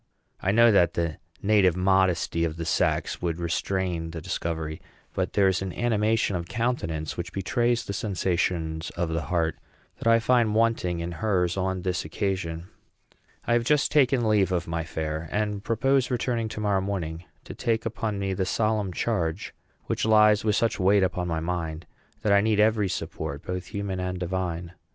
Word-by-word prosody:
I 95 - +1
know 115 +2 +6
that 85 -4 +3
the 85 -3 -1 0.3
native 100 -4 +4
modesty 90 -3 +2
of 80 -1 -2
the 85 - -4
sex 80 - 0
would 85 -2 -1
restrain 85 -1 -1
the 80 0 -6
discovery; 80 0 -4 0.3
but - - -2
there 100 -2 +4
is 95 -1 +1
an 95 -1 -3
animation 110 -3 +1
of 85 -1 -3
countenance, 85 -11 -2
which 85 0 -4
betrays 120 +5 0
the 100 - -4
sensations 85 -5 -1
of 85 -1 0
the 80 0 -1
heart, 80 +2 -1 0.4
that - - -3
I 115 0 +6
find 115 -2 +2
wanting 110 -7 +1
in 85 +1 -4
hers 90 -2 0
on 95 -1 -1
this 90 -2 -1
occasion. 90 -4 -3 0.8
I 120 - +1
have 120 0 +3
just 140 +2 +2
taken 130 -5 +3
leave 100 -3 +3
of 90 -1 -1
my 85 0 -2
fair, 80 0 -4
and 105 -1 -1
propose 130 +4 +2
returning 120 -2 -1
to 110 - -6
morrow 100 -2 +1
morning 90 -4 -4 0.2
to - - -8
take 110 -1 -1
upon 110 -2 -2
me 100 -1 -1
the 95 - -1
solemn 105 0 0
charge 90 -3 -2 0.3
which - - -2
lies 105 -1 +5
with 105 -2 +2
such 115 -1 +1
weight 95 +1 +4
upon 90 -1 -1
my 80 -2 -1
mind 80 -1 -3 0.4
that 105 -3 +3
I 100 - +6
need 110 0 +1
every 105 -2 +3
support, 70 -4 -4
both 90 -1 -4
human 100 -2 -3
and 90 0 -2
divine. 90 -1 -3
95 Hz, 180 wpm, -26 LUFS, 85-110 Hz, 0.8 s, know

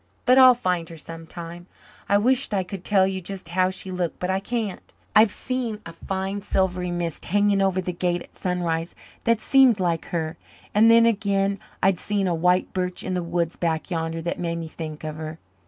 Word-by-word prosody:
But 255 0 +6
I'll 255 -1 +9
find 180 -8 -1
her 165 - -10
sometime. 165 +2 -9 0.4
I 200 - +5
wisht 250 +1 +2
I 190 - +1
could 185 0 -8
tell 195 -1 +4
you 190 0 -2
just 185 -1 -6
how 185 +1 +2
she 190 0 -6
looked 180 -2 -2
but 180 +1 -2
I 190 - +1
can't. 215 -1 -4 0.2
I've 215 +1 +7
seen 245 -3 -3
a 165 - -8
fine 190 +3 -3
silvery 185 -2 0
mist 175 -2 -3
hanging 205 +1 +2
over 190 -1 +2
the 180 0 -3
Gate 175 0 -1
at - - -21
sunrise 170 -2 -2 0.3
that 230 -1 +3
seemed 260 -3 +5
like 170 -3 0
her 160 -1 -3 0.4
and 220 +2 +6
then 230 0 +7
again 200 -3 +1 0.2
I've 190 -2 +3
seen 205 -2 -1
a 175 - +1
white 180 +2 +2
birch 180 -1 -2
in 185 - -3
the 180 - 0
woods 170 0 -2
back 165 +1 -2
yander 165 -1 -2
that 170 - -3
made 170 -1 -2
me 165 -1 -5
think 155 -1 -7
of 155 0 -5
her. 155 0 -6
185 Hz, 205 wpm, -24 LUFS, 170-200 Hz, 0.4 s, I'll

